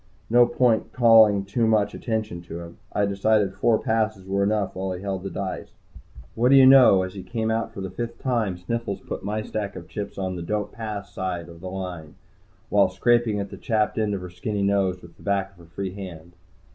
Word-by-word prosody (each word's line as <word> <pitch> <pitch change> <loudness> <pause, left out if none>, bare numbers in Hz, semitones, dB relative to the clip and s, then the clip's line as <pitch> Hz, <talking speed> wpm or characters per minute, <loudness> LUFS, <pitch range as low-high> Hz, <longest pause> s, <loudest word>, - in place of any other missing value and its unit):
No 120 0 +6
point 120 -2 +1
calling 110 -5 +6
too 115 +3 0
much 105 -2 +2
attention 110 -6 -3
to 85 0 -7
him. 85 0 -11
I 105 - +1
decided 100 0 +1
four 110 +3 +2
passes 110 -5 -1
were 100 +1 0
enough 100 -1 0
while 95 0 -3
he 90 - -7
held 95 -2 -3
the 95 - -5
dice. 95 -2 -5 0.6
What 120 +2 +2
do 140 - +7
you 135 -1 +8
know, 130 -8 +7
as 95 0 -6
he 100 - -7
came 110 +1 -2
out 115 0 -1
for 100 - -8
the 95 -1 -5
fifth 120 +3 -5
time, 115 -8 -1
Sniffles 100 +2 -3
pulled - - -6
my 105 +2 -3
stack 105 -2 -4
of - - -9
chips 105 -2 -6
to 95 -1 -3
the 85 - -5
"Don't 105 +4 -2
Pass" 105 -3 -6
side 90 -3 -3
of 85 0 -13
the 95 - -6
line, 90 -5 -6 0.5
while 100 -1 +4
scraping 115 +2 +2
at 100 - -5
the - - -8
chapped 110 -1 0
end 105 -2 0
of 95 - -5
her 90 -1 -8
skinny 100 +3 -3
nose 100 -2 +1
with 85 -1 -14
the - - -19
back 100 -1 -1
of 100 - -26
her 85 - -14
free 95 +3 -5
hand. 90 -4 -9
100 Hz, 220 wpm, -24 LUFS, 95-110 Hz, 0.6 s, you